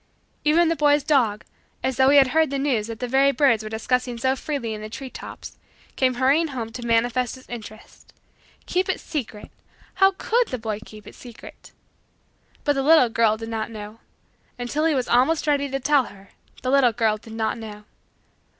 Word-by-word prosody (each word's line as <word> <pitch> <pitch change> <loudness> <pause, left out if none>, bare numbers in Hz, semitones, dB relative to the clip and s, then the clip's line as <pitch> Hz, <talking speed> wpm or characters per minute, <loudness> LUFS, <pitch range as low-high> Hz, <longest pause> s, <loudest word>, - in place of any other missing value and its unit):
Even 330 +3 +4
the 330 - +1
boy's 290 -2 +3
dog, 245 -8 +1 0.4
as 260 -2 -1
though 265 0 +5
he 285 - +6
had 270 -2 +6
heard 315 +2 +2
the 275 - -2
news 260 -6 0
that 225 -1 -7
the 250 - -3
very 270 +3 +3
birds 270 -6 +3
were 215 - -7
discussing 245 +2 -1
so 260 +3 +1
freely 265 -5 -4
in 215 - -7
the 215 - -7
tree 260 +3 -8
tops, - - -10 0.4
came 255 -1 +1
hurrying 275 +6 +2
home 240 -6 -5
to 240 +2 -8
manifest 240 +2 +1
his 260 - -16
interest. 215 -2 -11 0.5
Keep 370 +1 -1
it 375 - -1
secret! 235 -9 -6 0.4
How 385 0 +4
could 475 +1 +1
the 255 - -4
boy 220 -2 -4
keep 215 -1 -14
it - - -12
secret! 240 -3 -13 0.9
But 290 - +2
the 275 - -1
little 290 -3 +5
girl 225 -1 +2
did 225 0 -7
not 220 -1 -3
know. 215 0 -9 0.6
Until 250 +6 -2
he 320 -2 +2
was 255 -2 -1
almost 265 +8 +2
ready 285 -2 +1
to 270 0 -2
tell 280 -1 +3
her, 195 0 -14 0.3
the 255 - 0
little 265 -4 +4
girl 220 -2 +1
did 220 +1 -13
not 225 +1 -2
know. 210 -2 -9
250 Hz, 195 wpm, -23 LUFS, 225-285 Hz, 0.9 s, he